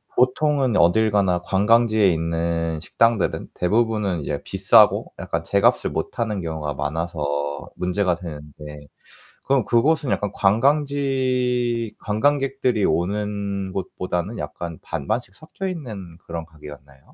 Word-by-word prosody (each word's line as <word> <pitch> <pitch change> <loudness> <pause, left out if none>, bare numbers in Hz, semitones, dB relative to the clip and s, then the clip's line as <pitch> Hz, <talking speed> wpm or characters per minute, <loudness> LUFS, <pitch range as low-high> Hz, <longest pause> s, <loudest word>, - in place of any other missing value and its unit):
보통은 130 -1 +2
어딜 110 +6 +4
가나 95 -3 +2
관광지에 110 +1 +3
있는 85 0 -1
식당들은 115 +4 +1
대부분은 105 -2 0
이제 - - -3
비싸고 - - +4
약간 - - -3
제 - - +1
값을 - - +3
못하는 110 -4 -2
경우가 80 -3 -3
많아서 80 +2 -3 0.5
문제가 90 0 0
되는데 75 -3 -10 0.6
그럼 135 -4 +2
그곳은 140 +6 +2
약간 105 - -1
관광지 125 -1 +1
관광객들이 130 0 +1
오는 100 +2 -1
곳보다는 90 +2 -3
약간 80 +2 -6
반반씩 115 +3 -3
섞여 160 +4 -7
있는 110 - -6
그런 85 -1 -6
가게였나요? 75 -4 -13
100 Hz, 290 characters per minute, -22 LUFS, 85-120 Hz, 0.6 s, 어딜